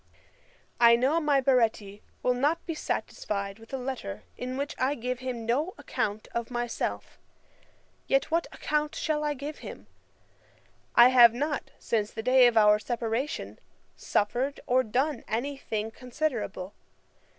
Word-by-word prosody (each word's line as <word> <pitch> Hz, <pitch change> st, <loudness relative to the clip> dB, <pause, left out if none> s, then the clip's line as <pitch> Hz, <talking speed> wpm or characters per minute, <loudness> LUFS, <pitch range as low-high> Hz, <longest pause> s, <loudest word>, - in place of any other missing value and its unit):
] -, -, -33 dB, 0.3 s
'I 235 Hz, -1 st, +8 dB
know 265 Hz, +7 st, +2 dB
my 295 Hz, -3 st, +3 dB
Baretti 225 Hz, -6 st, +1 dB, 0.2 s
will 250 Hz, -, +3 dB
not 290 Hz, +7 st, 0 dB
be 335 Hz, -, -3 dB
satisfied 200 Hz, -8 st, -3 dB
with 225 Hz, -, -15 dB
a 270 Hz, -, -2 dB
letter 245 Hz, -, -5 dB
in 255 Hz, +1 st, -5 dB
which 285 Hz, +2 st, -3 dB
I 265 Hz, +3 st, +1 dB
give 250 Hz, 0 st, -3 dB
him 250 Hz, -3 st, -5 dB
no 290 Hz, +11 st, 0 dB
account 210 Hz, +1 st, -3 dB
of 235 Hz, -1 st, -3 dB
myself: 240 Hz, -1 st, -3 dB, 0.9 s
yet 270 Hz, +2 st, +1 dB
what 335 Hz, +1 st, +1 dB
account 300 Hz, 0 st, -1 dB
shall 305 Hz, -2 st, -1 dB
I 295 Hz, -1 st, -1 dB
give 285 Hz, +3 st, -7 dB
him? -, -, -9 dB, 1.1 s
I 240 Hz, +1 st, +9 dB
have 240 Hz, -2 st, +7 dB
not, 290 Hz, +3 st, -2 dB
since 215 Hz, -2 st, -1 dB
the 220 Hz, -, -6 dB
day 255 Hz, 0 st, +6 dB
of 235 Hz, -2 st, +1 dB
our 210 Hz, -1 st, +6 dB
separation, 235 Hz, +5 st, -3 dB, 0.4 s
suffered 245 Hz, +7 st, -1 dB
or 255 Hz, +1 st, +3 dB
done 260 Hz, +6 st, -1 dB
any 265 Hz, +6 st, -2 dB
thing 220 Hz, -4 st, -4 dB
considerable. 235 Hz, -7 st, -3 dB
250 Hz, 150 wpm, -28 LUFS, 225-280 Hz, 1.1 s, I